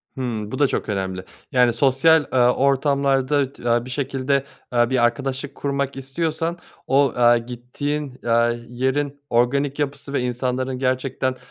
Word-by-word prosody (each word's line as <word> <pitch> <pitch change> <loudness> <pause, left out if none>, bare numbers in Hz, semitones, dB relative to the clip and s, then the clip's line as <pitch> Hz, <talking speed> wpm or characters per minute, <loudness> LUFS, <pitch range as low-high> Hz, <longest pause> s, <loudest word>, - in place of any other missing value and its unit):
Hımm, 115 -5 -4
bu 130 - -4
da 145 - +5
çok - - -3
önemli, 95 -2 -2 0.3
yani, 125 -2 +4
sosyal, 140 +5 +4
aaa, 125 -1 +4
ortamlarda 140 0 +2
t 120 - -4
aaa, 120 0 +2
bir - - -9
şekilde, 135 +1 -1 0.3
aaa, 120 -1 +3
bir 130 -2 +3
arkadaşlık 135 +3 -2
kurmak 140 -1 -2
istiyorsan 160 +5 -2 0.3
o, 135 0 +3
aaa, 120 0 +5
gittiğin, 125 +4 -5
aaa, 115 0 +3 0.2
yerin 135 +3 -1
organik 135 +4 +1
yapısı 140 -1 -3
ve 140 - +1
insanların 125 +1 -2
gerçekten, 130 0 -1
130 Hz, 145 wpm, -22 LUFS, 120-140 Hz, 0.3 s, da